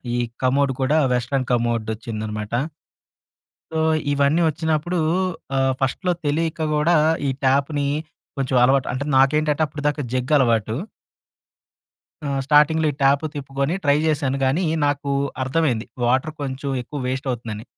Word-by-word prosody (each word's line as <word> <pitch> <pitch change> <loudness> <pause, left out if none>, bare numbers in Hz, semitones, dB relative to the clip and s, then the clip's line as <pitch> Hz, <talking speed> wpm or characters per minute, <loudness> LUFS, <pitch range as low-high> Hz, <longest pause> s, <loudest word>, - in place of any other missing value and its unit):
ఈ - - 0 0.3
కమోడ్ 135 +1 +2
కూడా 150 +4 +3
western 125 +1 -1
commode 115 -2 0
వచ్చిందనమాట. 110 -1 -5 1.2
సో, 160 - 0 0.3
ఇవన్నీ 145 +4 +2
వచ్చినప్పుడూ 160 +2 0 0.6
ఆహ్, 135 0 +2
ఫస్ట‌లో 180 +7 0
తెలియక 160 +2 -1
కూడా 150 +3 +3 0.3
ఈ - - +1 0.2
ట్యాప్‌ని 140 +2 +1 0.5
కొంచెం 135 -2 -1
అలవాటు 135 +1 +3
అంటే 130 +3 -3
నాకేంటంటే 150 +3 +3
అప్పటిదాకా 145 0 -2
జగ్ 130 +3 -1
అలవాటూ. 115 -4 +2 1.5
ఆహ్, 140 -1 -1
స్టార్టింగ్‌లో 155 +2 +4
ఈ - - -11
ట్యాప్ 140 +2 +4
తిప్పుకొని 140 +3 -2
ట్రై 145 0 +4
చేశాను 145 -3 0
కానీ 140 +8 +1 0.2
నాకు 145 -1 -1 0.3
అర్థమైంది 130 -4 0 0.2
వాటర్ 130 +6 +1
కొంచెం 135 0 -4
ఎక్కువ 145 +4 -7
వేస్ట్ 130 +1 -3
అవుతుందని. 110 -3 -5
140 Hz, 125 wpm, -22 LUFS, 130-150 Hz, 1.5 s, స్టార్టింగ్‌లో